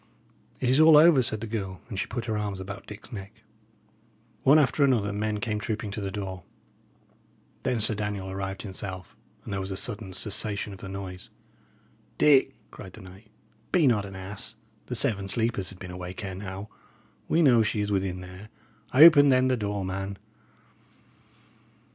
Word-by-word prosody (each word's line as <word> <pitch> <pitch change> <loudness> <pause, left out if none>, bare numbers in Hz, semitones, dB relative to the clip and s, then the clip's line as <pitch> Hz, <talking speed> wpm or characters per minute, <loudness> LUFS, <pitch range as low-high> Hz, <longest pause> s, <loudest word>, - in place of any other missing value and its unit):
"It 125 - -1
is 130 +5 +4
all 155 -1 +8
over," 155 -3 +7
said 110 -3 -2
the - - -3
girl; 100 -5 -4
and 105 -6 -5
she 105 - -2
put 120 0 -4
her 110 -2 -2
arms 105 -2 -3
about 100 +2 -8
Dick's 105 +1 -11
neck. 105 +1 -9 1.0
One 140 +3 +6
after 145 0 +3
another, 115 -7 +2
men 105 0 -2
came 105 -1 -2
trooping 105 -1 -4
to 105 - -5
the 100 - -3
door. 95 -2 -5 1.2
Then 125 - -1
Sir 110 - +3
Daniel 105 -2 -4
arrived 95 0 -5
himself, 95 -2 -7 0.3
and - - -6
there 100 - -1
was 95 0 -4
a 95 - -3
sudden 105 -5 -3
cessation 105 0 0
of 95 - -11
the 100 - -8
noise. 95 -2 -7 0.9
"Dick," 135 -2 +4 0.2
cried 95 -3 -11
the - - -11
knight, 95 +4 -14 0.4
"be 175 -4 +4
not 110 -6 +3
an 95 - -10
ass. 100 +4 -6 0.3
The 125 - -4
Seven 105 -6 +1
Sleepers 105 -2 0
had 95 - -8
been 90 -1 -8
awake 90 +1 -7
ere 95 - -5
now. 95 +2 -7 0.6
We 165 - +3
know 120 -6 +6
she 105 -1 0
is 105 0 -2
within 95 -2 -1
there. 95 +3 -11 0.5
Open, 145 -1 +9
then, 130 0 +4
the 130 - +2
door, 105 -3 -3
man." 95 +1 -4
105 Hz, 180 wpm, -27 LUFS, 95-115 Hz, 1.2 s, Open